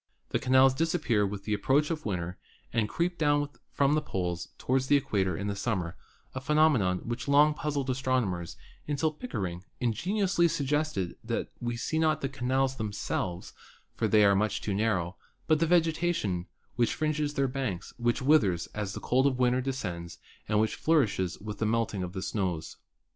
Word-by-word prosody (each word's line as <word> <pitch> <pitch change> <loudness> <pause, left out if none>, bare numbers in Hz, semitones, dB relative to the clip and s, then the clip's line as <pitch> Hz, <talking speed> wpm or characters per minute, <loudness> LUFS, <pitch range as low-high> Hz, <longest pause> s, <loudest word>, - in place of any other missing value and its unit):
The - - 0
canals 130 +1 +5
disappear 125 -9 +1
with 100 0 -6
the 105 - -1
approach 145 +8 +2
of 155 -6 -3
winter 90 -2 -3 0.3
and 110 -2 +1
creep 175 +1 -1
down 145 -1 +2 0.2
from 140 0 +2
the 155 - +2
poles 90 - -3
toward 130 +1 +1
the 145 +1 +4
equa 100 -7 0
tor 90 -3 -1
in 100 0 -2
summer, 95 -5 -2 0.4
a 130 - -4
phenomenon 135 -12 +2
which 120 +3 -4
long 145 +2 +5
puzzled 145 -3 -2
astrono 130 -2 +1
mers 85 -2 -5 0.3
until 150 +2 +1
Pickering 95 - -5 0.2
ingeniously 180 - +1
suggested 145 - -1
that - - -2
we 120 -1 -3
see 160 +6 -1
not 155 -1 +2
the 135 - -1
canals 135 0 0
themselves 100 -4 -3 0.4
(for - - 0
they 105 -1 +5
are 100 - +6
much 105 0 +1
too 105 - -2
narrow), 95 -4 0 0.3
but 155 -1 +3
the 165 - +2
vegetation 165 - +1 0.3
which 120 -2 +2
fringes 150 -1 -1
their 135 0 +2
banks, 125 -9 -4
which 120 +1 0
with 150 +2 +6
ers 90 -4 -1
as 105 -2 -3
the - - -5
cold 130 +2 +3
of 130 -2 0
winter 125 0 +2
descends 90 -11 -4 0.3
and 105 - +3
which 110 0 +1
flourishes 110 - +1
with 105 0 -7
the 110 - +1
melting 115 -3 0
of 90 0 -4
the 95 -2 -4
snows. 95 -5 -2
125 Hz, 180 wpm, -29 LUFS, 100-145 Hz, 0.4 s, are